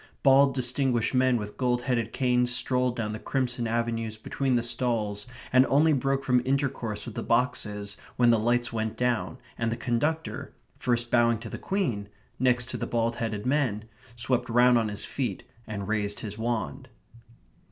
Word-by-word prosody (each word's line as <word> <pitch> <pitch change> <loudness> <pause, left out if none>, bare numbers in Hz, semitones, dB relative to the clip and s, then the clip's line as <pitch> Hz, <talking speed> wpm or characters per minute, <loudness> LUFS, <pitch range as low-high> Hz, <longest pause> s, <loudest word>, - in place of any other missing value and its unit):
Bald 135 0 +6
distinguished 125 -2 +1
men 130 -1 +3
with 105 -2 -6
gold 125 -1 +1
headed 120 -3 0
canes 125 -1 +2
strolled 125 0 0
down 110 -3 -2
the 110 - -5
crimson 125 -3 -1
avenues 115 -1 -1
between 130 +3 -1
the 120 - +1
stalls, 115 -4 -1 0.3
and 130 0 +7
only 155 +3 +4
broke 135 0 0
from 125 -2 +3
intercourse 130 -5 -1
with 120 - -7
the - - -4
boxes 105 -5 -1 0.2
when 120 -1 +5
the 115 - +3
lights 120 +1 +1
went 110 0 -2
down, 125 +1 0 0.2
and 115 -1 0
the 115 - -2
conductor, 150 +7 -2 0.2
first 120 -1 0
bowing 115 -1 +4
to 115 +1 -8
the - - -6
Queen, 120 - -2 0.3
next 125 -1 +2
to - - -3
the - - -3
bald 115 0 0
headed 110 -3 -3
men, 125 -6 0 0.3
swept 125 +1 -1
round 120 +1 +5
on 115 -2 +2
his 105 -1 -3
feet 120 -9 -3 0.2
and 100 -2 -5
raised 105 -1 -1
his 105 -2 -5
wand. 110 - -3
120 Hz, 175 wpm, -27 LUFS, 110-125 Hz, 0.3 s, and